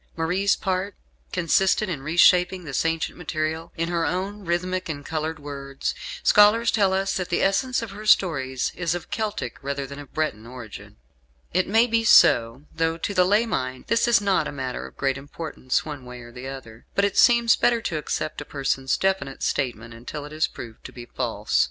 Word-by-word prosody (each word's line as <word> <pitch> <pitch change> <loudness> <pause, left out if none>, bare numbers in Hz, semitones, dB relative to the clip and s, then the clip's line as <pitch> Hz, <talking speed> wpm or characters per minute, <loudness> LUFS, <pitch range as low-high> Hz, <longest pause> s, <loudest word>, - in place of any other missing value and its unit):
Marie's 180 +5 +1
part 190 0 -2 0.4
consisted 190 +4 +2
in 160 -7 -4
reshaping 180 +4 +4
this 145 -1 -2
ancient 165 -1 -1
material 160 0 -3
in 165 +1 -1
her 170 -1 0
own 190 +6 -2
rhythmic 180 +1 -2
and 145 -2 -5
coloured 160 0 -3
words. 140 -2 -5 0.3
Scholars 220 +3 +5
tell 200 -3 +3
us 190 0 0
that 180 -2 -3
the 175 - +1
essence 240 +6 +1
of 225 - -7
her 210 +2 -8
stories 135 -11 +2
is 175 -1 -1
of 175 - -7
Celtic 215 -1 -3
rather 140 0 -3
than 140 +1 -9
of 145 -2 -11
Breton 115 -8 -2
origin. 120 -4 -10 0.6
It 185 +2 +2
may 225 +4 +4
be 230 -1 +1
so; 120 - +5
though 165 0 0
to 200 - -3
the 185 -2 +4
lay 205 +5 +3
mind 130 - -3
this 230 +1 +3
is 235 -2 +5
not 200 -2 +1
a - - -5
matter 130 -3 -5
of - - -17
great 135 -1 0
importance 145 -2 -3
one 145 -4 -7
way 125 0 -9
or 120 0 -12
the 125 +2 -8
other; 125 -4 -10
but 200 - +3
it 200 - -1
seems 235 -2 +5
better 240 -1 +2
to 165 -7 -2
accept 155 0 -3
a - - -4
person's 135 -2 -1
definite 190 -9 -1
statement 120 -3 -2
until 125 +6 -7
it 150 - -10
is 155 +1 +1
proved 115 -2 -10
to - - -8
be 120 -1 -10
false. 115 -4 -2
160 Hz, 195 wpm, -24 LUFS, 135-195 Hz, 0.6 s, Scholars